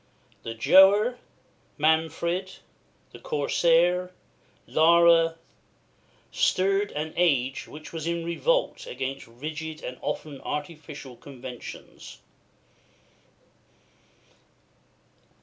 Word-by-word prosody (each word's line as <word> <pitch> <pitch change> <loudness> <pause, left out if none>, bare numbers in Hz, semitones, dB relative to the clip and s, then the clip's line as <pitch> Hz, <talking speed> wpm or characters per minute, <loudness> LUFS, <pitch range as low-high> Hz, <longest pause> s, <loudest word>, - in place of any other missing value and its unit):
"The 115 0 -6
Giaour" 190 - +7 0.2
(jow´ - - -14
er), - - -21 0.6
"Manfred," 160 +4 0 0.6
the - - -12
"Corsair," 170 +4 +2 0.6
"Lara" 170 +2 +5
(lah´ 165 -1 +5
rah), 165 - -11 1.0
stirred 195 +2 +1
an 155 +1 -4
age 135 -7 +1
which 150 +1 -11
was 165 -1 -4
in 170 0 -2
revolt - - 0
against 135 +1 -5
rigid 155 +6 -7
and 125 0 -7
often 145 -3 -5
artificial 150 -3 -6
conventions. 125 -1 -10
160 Hz, 90 wpm, -26 LUFS, 140-170 Hz, 1.0 s, Giaour